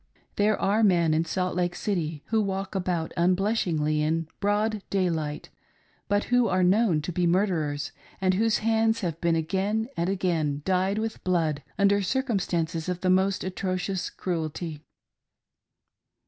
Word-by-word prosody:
There 210 +1 +2
are 210 +3 +2
men 170 -6 +4
in 160 +1 +1
Salt 180 +2 -1
Lake 175 0 0
City, 165 -8 -2
who 220 -1 +2
walk 195 -1 -3
about 180 -4 -2
unblush 185 +3 +1
ingly 155 -1 +1
in 160 +1 0
broad 210 +1 0
daylight, 165 -6 -1 0.6
but 205 0 +1
who 245 -1 +5
are 185 0 +2
known 185 -4 +3
to 180 - -3
be 175 +1 +1
murderers, 160 -6 0 0.3
and 185 -1 +2
whose 220 +3 +2
hands 225 0 +2
have 170 -4 -3
been 170 -1 +2
again 195 +8 -1
and 170 +2 0
again 160 -7 0
dyed 190 +2 +1
with 220 0 -3
blood 160 -5 0 0.2
under 200 0 +3
circumstances 180 - -1
of 180 -1 -3
the 185 - +2
most 190 +1 +2
atrocious 185 0 -2
cruelty. 160 -3 -4
185 Hz, 145 wpm, -26 LUFS, 165-200 Hz, 0.6 s, who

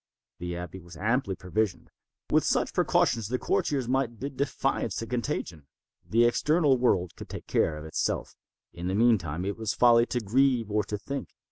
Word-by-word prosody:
The 90 0 -4
abbey 90 +1 -7
was 85 0 -13
amply 110 -1 0
provisioned. 100 +2 -2 0.4
With - - +4
such - - +1
precautions 115 -3 +2
the 125 +3 -1
courtiers 135 -1 0
might 125 -2 0
bid 140 +1 -5
defiance 135 -5 -1
to 115 - -3
contagion. 115 - -3 0.4
The 115 +1 +4
external 145 +2 +3
world 95 -8 +1
could - - -10
take - - -7
care 75 - +1
of 75 - -8
itself. 80 - -2 0.4
In 85 +1 -5
the 95 - 0
meantime 95 -8 +2
it 100 0 -3
was 110 -1 -2
folly 120 -1 +5
to 125 - -1
grieve, 120 0 +2
or 105 0 +2
to 105 - -3
think. 135 +7 -5
115 Hz, 175 wpm, -28 LUFS, 95-125 Hz, 0.4 s, folly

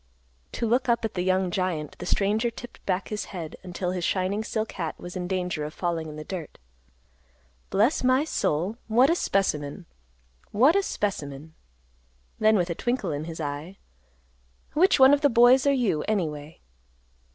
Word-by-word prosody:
To - - -2
look 245 +3 +1
up 235 -1 +2
at 220 - -3
the 180 - -2
young 185 0 +1
giant, 175 -5 -2
the 180 - -6
stranger 210 +5 +1
tipped 240 +1 -11
back 185 0 -1
his 210 -1 -3
head, 170 -5 -7
until 180 0 -4
his 180 -1 -3
shining 190 +4 0
silk 220 0 -3
hat 165 -3 -4
was 175 +1 -8
in 180 -1 -3
danger 180 -4 -2
of 150 +2 -6
falling 165 -3 -2
in 150 - -8
the 155 - -7
dirt. 175 -3 -7 1.1
"Bless 225 +11 +2
my 255 +2 +4
soul, 190 - -1
what 245 +7 +4
a - - +3
specimen! 175 - -1 0.6
What 265 - +4
a 400 - +4
specimen!" 155 - -4 0.9
Then 220 0 +4
with 175 -2 0
a - - +1
twinkle 240 -2 -2
in 145 +1 -3
his 165 0 -7
eye, 150 +5 -5 1.0
"Which 335 +1 +4
one 265 +1 +8
of 290 - +3
the 285 - +4
boys 250 +3 +5
are - - +5
you, 235 - +1
anyway?" 155 -7 -3
190 Hz, 175 wpm, -26 LUFS, 165-235 Hz, 1.1 s, one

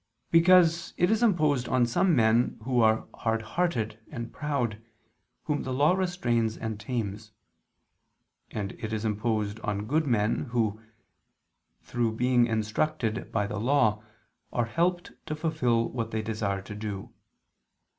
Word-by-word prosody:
Because 170 0 +5
it 175 +3 +3
is 220 +1 +2
imposed 155 - +2
on 125 -1 +3
some 165 +9 +2
men 115 0 +3
who 125 0 +2
are 110 0 +3
hard 115 0 -1
hearted 115 -7 -1
and 120 -5 -6
proud, 125 -8 -2 0.6
whom 150 -2 -1
the 130 - -4
law 145 +6 +3
restrains 125 - 0
and 110 -2 -4
tames: 110 -2 -4 1.2
and 100 -2 -4
it 110 0 -3
is 110 0 -2
imposed 105 -1 -1
on 105 -1 -3
good 155 +6 +1
men, 110 -1 +1
who, 115 -4 -1 1.0
through 120 -2 -1
being 125 +1 +3
instructed 110 +1 -1
by 105 -2 0
the 105 +1 -4
law, 110 -3 +2 0.5
are 120 - 0
helped 175 +8 0 0.2
to 155 - -2
fulfil 135 -8 +1
what 115 -2 -3
they 110 -1 -2
desire 105 -3 -2
to 105 - -8
do. 105 -2 -6
115 Hz, 140 wpm, -28 LUFS, 110-150 Hz, 1.2 s, Because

